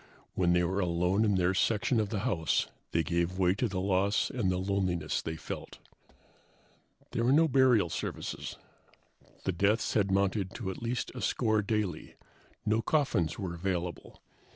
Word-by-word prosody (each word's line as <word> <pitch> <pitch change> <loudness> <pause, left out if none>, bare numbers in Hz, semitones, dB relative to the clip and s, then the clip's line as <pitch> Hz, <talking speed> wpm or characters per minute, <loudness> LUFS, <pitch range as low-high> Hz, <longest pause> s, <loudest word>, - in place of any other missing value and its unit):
When 85 -2 +2
they 90 0 +3
were 95 +3 0
alone 90 +3 +1
in 105 -2 +2
their 90 0 +2
section 110 +5 +1
of 105 -2 0
the 105 -2 -2
house 95 -9 +1 0.3
they 85 - +2
gave 85 +3 -1
way 90 -1 +3
to 120 +5 0
the 95 -3 -3
loss 100 +2 +1
and 115 -7 0
the 90 - +1
loneliness 95 -4 -1
they 80 - -4
felt. - - -7 1.3
There 115 - -1
were 120 - +3
no 160 +4 +5
burial 125 - +4
services. - - -4 0.9
The - - 0
deaths 100 +6 +1
had 100 -3 +2
mounted 95 0 0
to 100 -6 -3
at - - -9
least 120 +1 -2
a 125 - -7
score 110 +1 +1
daily. 105 -5 -2 0.5
No 110 +1 +2
coffins 115 - +1
were 95 -3 -4
available. 90 0 -4
95 Hz, 165 wpm, -30 LUFS, 90-110 Hz, 1.3 s, no